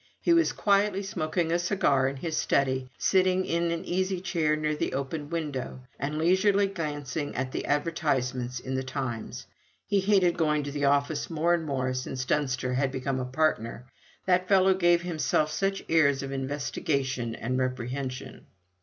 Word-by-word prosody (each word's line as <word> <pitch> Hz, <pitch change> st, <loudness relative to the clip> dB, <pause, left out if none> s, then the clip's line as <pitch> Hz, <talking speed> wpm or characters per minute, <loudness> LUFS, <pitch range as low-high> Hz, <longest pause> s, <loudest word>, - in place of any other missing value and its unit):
He 340 Hz, -, +3 dB
was 335 Hz, -1 st, +4 dB
quietly 200 Hz, -1 st, +2 dB
smoking 165 Hz, -3 st, -1 dB
a 170 Hz, -, +2 dB
cigar 160 Hz, -8 st, +2 dB
in 135 Hz, -, -3 dB
his 160 Hz, +4 st, -3 dB
study, 130 Hz, -3 st, +1 dB
sitting 185 Hz, -1 st, +2 dB
in 170 Hz, 0 st, 0 dB
an 165 Hz, 0 st, -3 dB
easy 185 Hz, +1 st, -1 dB
chair 165 Hz, -4 st, +1 dB
near 155 Hz, 0 st, -1 dB
the -, -, -2 dB
open 145 Hz, +2 st, -3 dB
window, 145 Hz, -6 st, -4 dB, 0.2 s
and 150 Hz, +2 st, -2 dB
leisurely 190 Hz, +5 st, +3 dB
glancing 150 Hz, -6 st, -4 dB
at 130 Hz, -, 0 dB
all 130 Hz, -, -11 dB
the -, -, -3 dB
advertisements 130 Hz, -5 st, -1 dB
in 130 Hz, +1 st, -5 dB
The 130 Hz, -, 0 dB
Times. 130 Hz, -4 st, -5 dB, 0.4 s
He 200 Hz, -, +2 dB
hated 190 Hz, -3 st, +3 dB
going 150 Hz, -2 st, +2 dB
to 145 Hz, -, -5 dB
the 145 Hz, 0 st, -1 dB
office 140 Hz, +2 st, +1 dB
more 165 Hz, +1 st, +1 dB
and 170 Hz, -2 st, 0 dB
more 130 Hz, -2 st, -1 dB
since 130 Hz, 0 st, -3 dB
Dunster 130 Hz, -3 st, 0 dB
had 135 Hz, +1 st, +1 dB
become 130 Hz, 0 st, -2 dB
a 130 Hz, -, -2 dB
partner; 125 Hz, -4 st, -1 dB, 0.4 s
that 185 Hz, 0 st, +2 dB
fellow 190 Hz, -1 st, +5 dB
gave 175 Hz, -2 st, +3 dB
himself 155 Hz, -3 st, 0 dB
such 195 Hz, +5 st, -1 dB
airs 140 Hz, -4 st, +3 dB
of 135 Hz, -, -5 dB
investigation 135 Hz, -2 st, -2 dB
and 130 Hz, +3 st, -2 dB
reprehension. 130 Hz, +1 st, -4 dB
150 Hz, 170 wpm, -28 LUFS, 130-175 Hz, 0.4 s, fellow